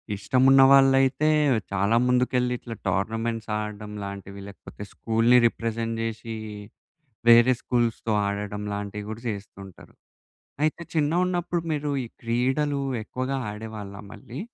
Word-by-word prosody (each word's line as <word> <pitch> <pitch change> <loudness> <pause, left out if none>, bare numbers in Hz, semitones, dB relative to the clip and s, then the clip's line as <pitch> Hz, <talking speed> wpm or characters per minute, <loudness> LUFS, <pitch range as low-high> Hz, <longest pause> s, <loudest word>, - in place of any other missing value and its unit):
ఇష్టమున్న 130 +6 +4
వాళ్ళైతే, 135 +2 +5 0.4
చాలా 100 +3 +1
ముందుకెళ్ళి 125 0 +1
ఇట్లా, 115 -2 -8
టోర్నమెంట్స్ 115 +3 -2
ఆడడం 105 0 -6
లాంటివి, 100 0 -8
లేకపోతే 100 +1 -11
స్కూలుని 115 +2 +3
రిప్రజెంట్ 115 0 -3
జేసి, 115 0 -5 0.9
వేరే 120 +2 +7
స్కూ‌ల్స్‌‌తో 115 -2 0
ఆడడం 105 0 -4
లాంటివి 100 0 -5
గూడా 110 +2 -7
జేస్తుంటారు. 100 -2 -9 0.7
అయితే, 155 +2 -1
చిన్నగున్నప్పుడు 175 +2 0
మీరు 150 -1 -2
ఈ - - -7 0.2
క్రీడలు 130 +5 0 0.2
ఎక్కువగా 130 +4 -3
ఆడేవాళ్ళా 105 -2 -8
మళ్ళీ? 130 +4 -9
115 Hz, 105 wpm, -25 LUFS, 105-135 Hz, 0.9 s, వేరే